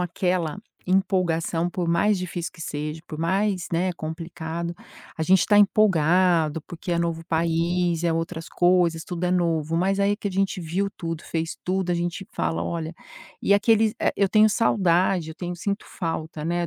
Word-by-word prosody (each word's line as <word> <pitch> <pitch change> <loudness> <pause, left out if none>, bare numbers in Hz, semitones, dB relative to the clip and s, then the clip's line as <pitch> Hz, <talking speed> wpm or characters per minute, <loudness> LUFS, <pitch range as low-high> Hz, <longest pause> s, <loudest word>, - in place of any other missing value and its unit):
aquela 180 -1 -1 0.3
empolgação, 180 -3 +1
por 175 -1 -3
mais 200 +5 +3
difícil 175 -1 -4
que 165 - -15
seja, 150 0 -4
por 155 - -7
mais, 190 +2 0
né, 180 +2 +1
complicado, 165 +1 -5 0.5
a - - 0
gente 185 +1 +4
tá 205 0 +5
empolgado 175 -5 +3
porque 175 +3 -6
é 170 - +1
novo 165 -1 -2
país, 170 +1 0
é 170 - +2
outras 165 0 -3
coisas, 175 -2 +2
tudo 175 0 -4
é 180 - +1
novo, 165 -3 0
mas 195 +3 +1
aí 200 +1 +2
que 205 -1 -3
a - - -5
gente 195 0 -1
viu 180 +4 -1
tudo, 165 -1 -5
fez 165 0 -3
tudo, 185 0 -1
a - - +2
gente 175 +2 -3
fala: 165 - -1
"Olha". 165 -1 -4 0.5
E - - +3
aqui 205 +3 +4
eles 220 -1 +3
eh, - - +2
eu 200 -1 +3
tenho 215 +2 +5
saudade, 185 -5 +2
eu 160 - -9
tenho 175 0 -5
sinto 200 +3 -3
falta, 160 -3 -4
né, 175 +1 0
175 Hz, 180 wpm, -24 LUFS, 165-190 Hz, 0.5 s, tá